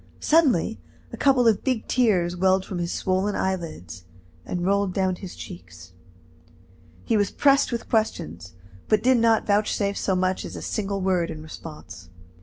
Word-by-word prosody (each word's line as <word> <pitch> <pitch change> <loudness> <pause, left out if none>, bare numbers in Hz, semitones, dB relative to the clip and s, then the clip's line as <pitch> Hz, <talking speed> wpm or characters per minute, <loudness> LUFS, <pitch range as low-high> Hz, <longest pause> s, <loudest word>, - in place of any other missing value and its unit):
Suddenly 270 - +2 0.3
a - - -3
couple 260 -4 +3
of 220 -3 +2
big 255 -4 -1
tears 185 -8 +2
welled 190 +1 +2
from 185 - -5
his 170 0 -2
swollen 190 +2 0
eyelids, 160 - -4 0.4
and 175 -1 -3
rolled 200 -1 +1
down 190 -2 0
his 190 -1 -9
cheeks. 85 0 -11 1.1
He - - +1
was 205 -2 +2
pressed 275 -1 +3
with 235 -1 -4
questions, 90 - -2 0.3
but 215 -1 +2
did 255 -1 +4
not 225 -1 +3
vouchsafe 205 -1 0
so 190 - 0
much 185 0 0
as - - -7
a - - -6
single 200 -2 -2
word 185 -3 +1
in 155 -1 -7
response. 155 - -10
190 Hz, 160 wpm, -24 LUFS, 170-220 Hz, 1.1 s, did